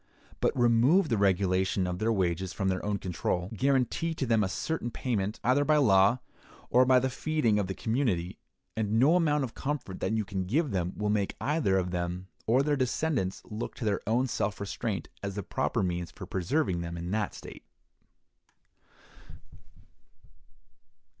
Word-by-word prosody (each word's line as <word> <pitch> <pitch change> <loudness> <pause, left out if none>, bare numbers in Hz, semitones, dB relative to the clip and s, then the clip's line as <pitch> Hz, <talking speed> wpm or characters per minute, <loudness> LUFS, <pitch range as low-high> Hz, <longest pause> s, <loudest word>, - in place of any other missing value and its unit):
But - - +1
remove 125 +9 +4
the 115 - +1
regulation 95 -1 +2
of 90 0 -3
their 110 +1 +1
wages 95 -3 0
from 95 -2 -1
their 95 0 -1
own 105 -1 -1
control; 90 0 -2
guarantee 135 +6 +1
to 135 - -2
them 115 -3 +3
a 95 - -1
certain 160 +4 -2
payment, 110 -4 -2
either 130 +5 +3
by 155 +1 +3
law 100 -4 +5 0.5
or 125 +1 +6
by 130 0 +5
the 130 +1 +2
feeding 130 -5 0
of 100 - -1
the 95 - -4
community; 110 -8 -1 0.4
and 110 -1 -1
no 135 +9 +5
amount 150 -5 +2
of 125 - -4
comfort 135 -10 -4
that - - -1
you 110 -2 0
can 95 -3 -3
give 140 - 0
them 90 -2 -1
will 105 0 0
make 100 -2 0
either 115 - +1
them 90 +1 -4 0.2
or 125 +5 +4
their 150 0 +1
descendants 130 -6 -1
look 110 +2 -6
to - - -5
their 105 -2 0
own 120 +4 +2
self 105 -5 -2
restraint 100 +1 -3
as 100 -1 -4
the 100 - -3
proper - - -1
means 90 -1 -2
for - - -9
preserving 95 - 0
them 85 0 -5
in 85 +1 -5
that 105 -1 -1
state. - - -10
105 Hz, 170 wpm, -29 LUFS, 95-130 Hz, 0.5 s, or